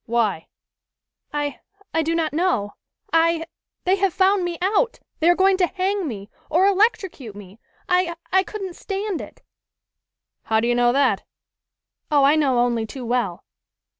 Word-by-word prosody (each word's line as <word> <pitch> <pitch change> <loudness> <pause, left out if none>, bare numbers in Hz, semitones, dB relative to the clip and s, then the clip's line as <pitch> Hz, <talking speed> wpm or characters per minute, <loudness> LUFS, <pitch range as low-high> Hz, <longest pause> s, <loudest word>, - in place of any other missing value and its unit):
"Why?" 220 -8 0 0.8
"I 290 -2 -3 0.3
I 325 - +2
do 325 +1 -1
not 320 -2 -1
know. 300 - 0 0.4
I 330 0 +3 0.4
they 375 +2 +2
have 390 -2 0
found 385 0 +3
me 345 -1 -3
out! 425 +6 +1 0.2
They 325 - +4
are 350 - +5
going 380 0 +4
to 365 -2 +3
hang 380 0 -1
me, 205 -5 -7 0.2
or 345 +5 +3
electrocute 390 - +1
me! 205 +1 -12 0.3
I 360 -2 +1 0.2
I 380 - +5
couldn't 390 -2 -6
stand 395 -2 -3
it!" - - -12 1.0
"How 220 0 +2
do 230 - 0
you 240 - +2
know 240 0 +3
that?" 280 +3 +2 0.9
"Oh, 290 -2 +4
I 285 +2 +5
know 280 -5 +2
only 240 -2 +1
too 250 +2 -7
well." 235 -7 -1
325 Hz, 160 wpm, -22 LUFS, 240-375 Hz, 1.0 s, are